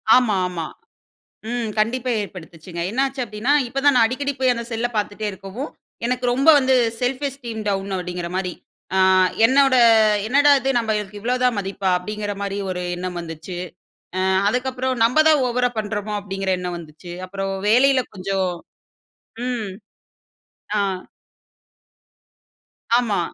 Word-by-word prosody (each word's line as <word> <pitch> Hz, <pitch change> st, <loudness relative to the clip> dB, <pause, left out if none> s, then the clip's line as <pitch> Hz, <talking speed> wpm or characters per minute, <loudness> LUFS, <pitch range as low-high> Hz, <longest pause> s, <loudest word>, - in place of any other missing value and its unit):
ஆமா. 245 Hz, -5 st, +3 dB
ஆமா. 175 Hz, -3 st, -4 dB, 0.9 s
ம். 240 Hz, -2 st, -2 dB
கண்டிப்பா 240 Hz, +4 st, 0 dB
ஏற்படுத்துச்சுங்க. 170 Hz, -3 st, -8 dB
என்னாச்சு 270 Hz, +3 st, -1 dB
அப்டீன்னா, 215 Hz, +5 st, -1 dB, 0.2 s
இப்ப 270 Hz, +3 st, -2 dB
தான் 285 Hz, -1 st, +6 dB
நான் 230 Hz, -, +6 dB
அடிக்கடி 280 Hz, +4 st, -2 dB
போயி 260 Hz, -1 st, +3 dB
அந்த 235 Hz, 0 st, -4 dB
செல்ல 230 Hz, +2 st, 0 dB
பாத்துட்டே 210 Hz, 0 st, -2 dB
இருக்கவும், 195 Hz, +9 st, -7 dB, 0.4 s
எனக்கு 250 Hz, +1 st, -1 dB
ரொம்ப 270 Hz, +5 st, +1 dB
வந்து 265 Hz, -1 st, +3 dB, 0.3 s
செல்ஃப் 255 Hz, +2 st, -1 dB
எஸ்டீம் 240 Hz, -5 st, -7 dB
டவுன் 195 Hz, 0 st, -1 dB
அப்டீங்குற 180 Hz, -1 st, -4 dB
மாரி 185 Hz, -2 st, -2 dB, 0.9 s
என்னோட, 265 Hz, +2 st, +5 dB, 0.5 s
"என்னடா 285 Hz, +5 st, +4 dB
இது 265 Hz, +1 st, -1 dB
நம்மளுக்கு 210 Hz, -3 st, -2 dB
இவ்ளோதான் 250 Hz, +1 st, +1 dB
மதிப்பா?" 195 Hz, 0 st, -2 dB
அப்டீங்குற 210 Hz, +3 st, -4 dB
மாரி 200 Hz, 0 st, -3 dB
ஒரு 180 Hz, -1 st, -3 dB
எண்ணம் 180 Hz, 0 st, -4 dB
வந்துச்சு. 165 Hz, +1 st, -7 dB, 0.6 s
அ -, -, +1 dB, 0.3 s
அதுக்கப்புறம் 255 Hz, +2 st, -1 dB
"நம்ம 255 Hz, +7 st, +4 dB
தான் 305 Hz, -3 st, +5 dB
ஓவரா 245 Hz, 0 st, +1 dB
பண்றோமோ?" 210 Hz, 0 st, -3 dB
அப்டீங்கிற 195 Hz, -1 st, -3 dB
எண்ணம் 180 Hz, -1 st, -4 dB
வந்துச்சு. 165 Hz, +1 st, -11 dB
அப்புறம் 195 Hz, +1 st, -4 dB, 0.2 s
வேலையில 260 Hz, +3 st, +5 dB
கொஞ்சம் 190 Hz, 0 st, -1 dB, 1.0 s
ம் 235 Hz, -5 st, -2 dB, 1.1 s
ஆ. -, -, +2 dB, 2.2 s
ஆமா. 225 Hz, -6 st, +1 dB
220 Hz, 130 wpm, -22 LUFS, 195-255 Hz, 2.2 s, தான்